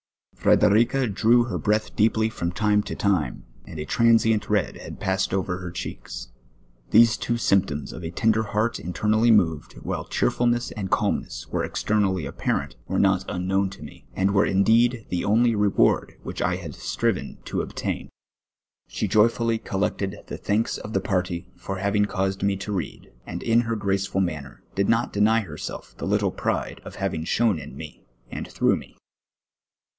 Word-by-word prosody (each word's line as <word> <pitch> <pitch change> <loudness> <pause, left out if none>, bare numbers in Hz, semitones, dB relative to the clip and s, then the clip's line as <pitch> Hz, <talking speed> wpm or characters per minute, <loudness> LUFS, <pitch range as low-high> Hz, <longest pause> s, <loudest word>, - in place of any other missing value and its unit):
Frederica 120 +6 +3
drew 115 +4 +4
her 120 - -3
breath 105 +1 0
deeply 110 +1 +3
from 85 -6 -3
time 105 +3 +2
to - - -6
time, 90 -11 0 0.2
and 80 - -8
a 75 - -4
transient 115 +1 +3
red 105 -6 +1
had - - -9
passed 95 +1 0
over 95 -1 -1
her 90 -1 -6
checks. 60 -7 -7 0.6
These 115 0 +6
two 120 - -1
spni)toms 95 -10 +1
of - - -8
a 80 - -3
tender 110 +5 +1
heait 110 +3 0
in 90 - -5
ternally 110 +8 +2
moved, 80 -8 +2
while - - -3
cheerfulness 120 0 +1
and 100 -4 -4
calmness - - -1
were - - -1
exter - - -2
nally 95 -4 +1
apparent, 70 -3 -2
were - - -1
not 95 -1 +2
miknown 95 +2 0
to 75 - -11
me, 75 - -12
and 95 +1 +2
were 100 +1 +4
indeed 115 +4 +3
the 90 - -1
onlv 115 +3 +3
reward 105 -1 +2
which - - -5
I 90 +1 +1
had 85 -5 -7
striven - - -2
to - - -2
obtain. - - -4 0.8
She 105 - -2
iovfully 115 +2 +2
col 95 -4 -3
lected 100 -1 -2
the - - -6
thanks 105 +3 0
of 105 - -8
the 95 - +1
party 90 -2 -2
for 95 - -5
having 100 +2 +1
caused 95 -1 -2
me 100 0 +2
to 100 +2 -5
read, 95 -5 -5 0.2
and - - -5
in 115 +1 +4
her 115 -1 -2
graceful 95 -2 0
manner 75 -7 -4
did 100 0 0
not 115 +1 +1
deny 110 +2 +3
herself 80 -8 -7
the - - -3
little - - +1
pride - - -2
at - - -9
having 80 - -2
shone 110 -3 +2
in 65 - -10
me 75 -1 -9 0.3
and - - -5
through - - +2
me. - - -13
100 Hz, 175 wpm, -24 LUFS, 90-110 Hz, 0.8 s, These